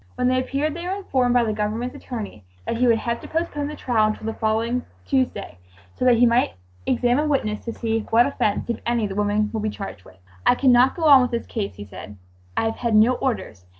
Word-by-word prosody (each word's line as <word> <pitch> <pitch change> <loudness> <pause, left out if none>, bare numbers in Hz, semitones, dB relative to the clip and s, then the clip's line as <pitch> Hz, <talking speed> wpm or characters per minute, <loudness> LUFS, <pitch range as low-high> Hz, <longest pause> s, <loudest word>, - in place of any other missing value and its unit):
When 250 0 +1
they 255 0 +2
appeared 280 +4 -1
they 340 +2 -6
were 375 - -1
informed 260 -11 0
by 245 - +5
the 220 -2 -1
Government's 220 +4 -2
attorney 210 - -7 0.2
that 230 - -2
he 250 +1 +3
would 230 -1 +4
have 235 +1 -3
to - - -9
postpone 315 -3 -2
the 300 - -6
trial 230 -6 +1
until 215 0 -4
the 225 - -2
following 225 +3 -1 0.2
Tuesday 255 - -1 0.3
so - - -3
that 245 -2 +5
he 245 - +5
might 235 - +2 0.3
examine 250 +5 +2
witnesses 215 -7 -1
to - - -18
see 225 -1 0
"what 235 +2 +5
offense, 215 -7 -1
if 235 - -2
any, 235 -2 0
the 200 - -4
women 210 +1 0
would 220 - -2
be 215 - -1
charged 195 - -7
with." 95 0 -18 0.3
"I - - +4
cannot 255 0 +4
go 335 - -5
on 285 -4 +8
with 250 - +1
this 235 -1 -3
case," 205 -3 -4
he 100 - -9
said, 100 +1 -10 0.4
"I - - +2
have 225 - -2
had 235 -3 0
no 220 +4 +6
orders. 220 - -3
235 Hz, 235 wpm, -23 LUFS, 215-255 Hz, 0.4 s, on